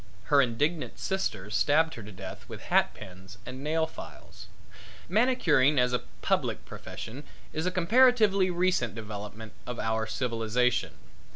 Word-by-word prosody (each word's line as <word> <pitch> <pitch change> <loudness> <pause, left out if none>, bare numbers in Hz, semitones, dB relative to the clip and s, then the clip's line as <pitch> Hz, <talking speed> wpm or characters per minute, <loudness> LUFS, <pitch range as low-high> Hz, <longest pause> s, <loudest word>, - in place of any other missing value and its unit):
Her 140 - +8
indignant 145 +7 -1
sisters 105 - -2
stabbed 160 +5 +3
her 115 - -8
to 105 0 -10
death 95 0 -9
with - - -7
hat - - +4
pins 95 +2 -11
and 130 +2 -7
nail 160 +2 +1
files. 160 - -11 0.6
Manicuring 175 - +3
as 125 -1 +3
a 125 - +1 0.2
public - - 0
profession 125 +6 -8 0.3
is 160 +3 -1
a - - +1
comparatively 205 0 +4
recent 175 - +1
development 110 0 -7
of 125 -1 -4
our 110 0 -1
civilization. 115 +1 0
130 Hz, 135 wpm, -28 LUFS, 110-175 Hz, 0.6 s, Her